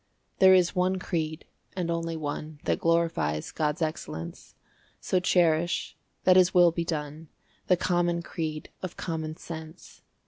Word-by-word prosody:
There 190 0 +8
is 180 +1 +3
one 185 +1 +2
creed, 160 -4 -3 0.3
and 175 -2 -1
only 165 -1 -2
one, 155 0 -5
That - - 0
glorifies 165 - 0
God's 155 +2 -1
excellence; 85 - -5 0.4
So 185 - +1
cherish, 175 -2 +2 0.3
that 185 0 +6
His 185 0 +4
will 175 -1 +7
be 170 +1 -2
done, 155 -1 -4 0.4
The 180 - +4
common 175 -1 +1
creed 155 -2 -5
of 185 -2 -6
common 160 -2 -4
sense. 160 +1 -10
165 Hz, 140 wpm, -27 LUFS, 155-180 Hz, 0.4 s, There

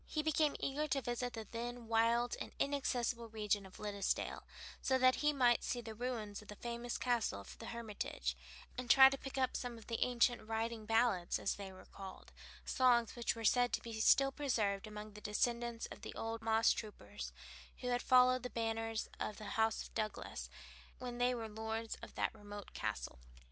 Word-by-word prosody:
He 305 - -1
became 310 -1 +2
eager 295 +3 -1
to 275 -2 +1
visit 245 +1 -2
the 225 -1 -5
then 240 0 -5
wild 230 +2 +3
and - - -6
inaccessible 250 -4 0
region 210 -2 0
of 185 - -14
Liddesdale, 200 -2 -1 0.4
so 260 - +3
that 255 0 +5
he 300 0 +4
might 245 -4 +4
see 245 - -1
the 225 -2 -6
ruins 220 -3 -3
of 210 - -15
the 210 - -8
famous 235 +1 -4
castle 240 - +1
of 100 - -10
the - - -7
Hermitage, 210 - -3 0.4
and 250 -1 -5
try 265 +2 +10
to 275 - -1
pick 270 0 -6
up 260 -1 +1
some 245 -2 -3
of 225 - -12
the 230 -1 0
ancient 245 0 +3
"riding 225 0 -3
ballads" 225 -6 +3
as - - 0
they 195 -1 -7
were 185 - -13
called, 195 -1 -10 0.3
songs 240 -4 +3
which 240 -1 0
were 230 - -6
said 245 +2 +4
to - - +1
be 225 -1 -5
still 275 +4 +6
preserved 220 -8 0
among 210 0 -8
the 210 - -10
descendants 235 +2 0
of - - -9
the - - -7
old 225 0 -3
moss 225 0 +4
troopers, 100 - -6 0.5
who 250 - -2
had 245 0 +1
followed 255 0 +6
the 250 - -4
banners 225 -1 -1
of 210 - -3
the 205 -2 -6
House 220 0 +2
of - - -12
Douglass, 215 -1 -3 0.5
when 245 -1 -5
they 250 +1 +3
were 225 -2 -4
lords 220 +1 -3
of - - -10
that - - 0
remote 205 -2 -9
castle. - - -3
230 Hz, 195 wpm, -37 LUFS, 215-245 Hz, 0.5 s, try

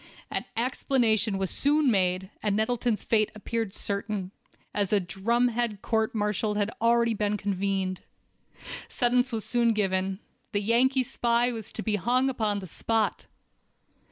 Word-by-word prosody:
An - - -2
explanation 230 -4 +1
was 190 -1 -1
soon 290 -1 +3
made, 185 -1 +1
and 205 -2 0
Nettleton's 225 +1 0
fate 215 -2 +2
appeared 220 -1 -3
certain, 200 -2 -2 0.4
as 205 -2 0
a 210 - +4
"drumhead" 230 +3 0
court 220 +1 0
martial 210 0 0
had 205 +1 0
already 235 0 +3
been 210 -1 0
convened. 195 -1 -1 0.9
Sentence 245 +1 +1
was 225 -2 -3
soon 235 -2 +2
given—the 195 0 -2
Yankee 250 +5 +3
spy 240 0 +1
was 225 -2 -6
to 220 - -5
be 215 -2 0
hung 250 +6 +2
upon 215 -5 -1
the - - -7
spot! 215 +2 -1
220 Hz, 135 wpm, -27 LUFS, 200-235 Hz, 0.9 s, a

